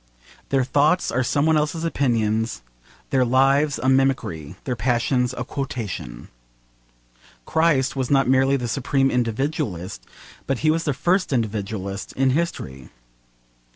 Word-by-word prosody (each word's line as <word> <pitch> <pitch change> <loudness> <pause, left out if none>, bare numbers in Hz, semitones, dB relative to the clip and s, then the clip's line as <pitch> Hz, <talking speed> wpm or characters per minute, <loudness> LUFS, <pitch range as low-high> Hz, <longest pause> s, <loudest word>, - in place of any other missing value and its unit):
Their 135 -2 +2
thoughts 145 +7 +2
are 125 - +1
some 140 +3 +1
one 160 -1 +4
else's 150 +2 -1
opinions, 115 - 0 0.5
their 130 -1 +3
lives 135 +4 +3
a 130 - -2
mimicry, 130 - +1
their 125 - -2
passions 125 +2 +1
a - - -2
quotation. 110 - -5 1.2
Christ 150 -4 +2
was 130 -2 -2
not 135 -2 +3
merely 135 +1 +3
the 125 -2 -3
supreme 135 +2 +1
individualist, 115 - -2 0.4
but 135 - 0
he 155 - +5
was 165 +1 -1
the 145 -4 0
first 175 +6 +1
individualist 100 -4 -3
in 135 0 +2
history. 75 - -3
130 Hz, 130 wpm, -22 LUFS, 115-140 Hz, 1.2 s, he